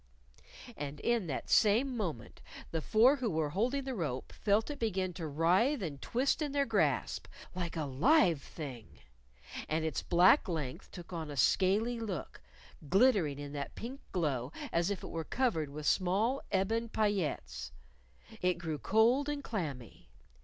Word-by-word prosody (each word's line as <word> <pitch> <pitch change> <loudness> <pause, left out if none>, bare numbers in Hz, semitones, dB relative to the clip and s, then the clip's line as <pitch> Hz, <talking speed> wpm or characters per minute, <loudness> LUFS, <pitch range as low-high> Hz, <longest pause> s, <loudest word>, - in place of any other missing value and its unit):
_" - - -12
And 145 0 -6
in 235 -6 +1
that 135 - -4
same 235 +5 +4
moment, 165 - -4 0.3
the 160 - -1
four 235 - +5
who 250 -4 -1
were 155 -4 -1
holding 250 - 0
the 265 0 -4
rope 150 - -3
felt 215 +6 +1
it 290 - -7
begin 190 -5 -1
to 165 -2 -5
writhe 185 - +2
and 145 -5 -5
twist 265 +6 0
in 295 -2 -2
their 280 -1 +2
grasp! - - 0 0.3
like 175 -2 -4
a 155 - -1
live 170 - +3
thing. 130 -10 -9 0.7
And 160 +1 0
its 160 - -1
black 185 +7 +5
length 150 -7 -4
took 175 0 -10
on 160 -3 -4
a 145 - -6
scaly 210 - +2
look, 205 -7 -5 0.5
glittering 190 - +4
in 145 0 -7
that 140 -1 -5
pink 260 +4 -7
glow 140 -7 -1 0.2
as 170 +2 +1
if 200 -3 -3
it - - -6
were 165 -1 -3
covered 170 - 0
with 150 +1 -7
small 205 - +2
ebon 225 +5 0
paillettes. 165 - -1 0.7
It 180 0 +2
grew 160 -4 -4
cold 235 - +3
and 290 -1 -3
clammy. 145 - -5
185 Hz, 160 wpm, -32 LUFS, 155-230 Hz, 0.7 s, four